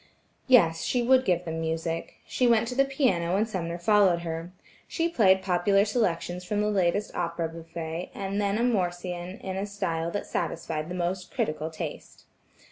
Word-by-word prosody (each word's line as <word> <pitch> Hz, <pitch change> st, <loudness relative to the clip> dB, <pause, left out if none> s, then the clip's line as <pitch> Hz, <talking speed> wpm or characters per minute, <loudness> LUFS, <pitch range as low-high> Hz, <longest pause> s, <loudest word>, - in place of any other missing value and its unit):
Yes, 165 Hz, -11 st, +5 dB
she 245 Hz, -1 st, +1 dB
would 260 Hz, +1 st, +4 dB
give 180 Hz, -3 st, +1 dB
them 160 Hz, -1 st, -3 dB
music. 165 Hz, +1 st, -3 dB
She 250 Hz, -, +1 dB
went 230 Hz, -1 st, +4 dB
to -, -, -3 dB
the 275 Hz, +1 st, +4 dB
piano 240 Hz, -, +1 dB
and 215 Hz, +3 st, +2 dB
Sumner 170 Hz, -5 st, -3 dB
followed 190 Hz, -1 st, +4 dB
her. 165 Hz, +1 st, -5 dB, 0.4 s
She 330 Hz, -, 0 dB
played 190 Hz, -, +4 dB
popular 195 Hz, +2 st, +3 dB
selections 180 Hz, -5 st, -1 dB
from 205 Hz, +3 st, -2 dB
the 210 Hz, -, +1 dB
latest 195 Hz, +1 st, +1 dB
opera 170 Hz, -1 st, -2 dB
bouffe, 165 Hz, +1 st, -6 dB
and 200 Hz, +1 st, -2 dB
then 200 Hz, 0 st, +1 dB
a 235 Hz, -, +1 dB
morcean 180 Hz, -4 st, -2 dB
in 190 Hz, 0 st, -4 dB
a 200 Hz, +1 st, -2 dB
style 165 Hz, -5 st, -2 dB
that 205 Hz, +4 st, -3 dB
satisfied 160 Hz, -1 st, -3 dB
the 180 Hz, -, -4 dB
most 180 Hz, +1 st, -2 dB
critical 155 Hz, +1 st, -2 dB
taste. 160 Hz, -, -7 dB
180 Hz, 175 wpm, -27 LUFS, 170-210 Hz, 0.4 s, Yes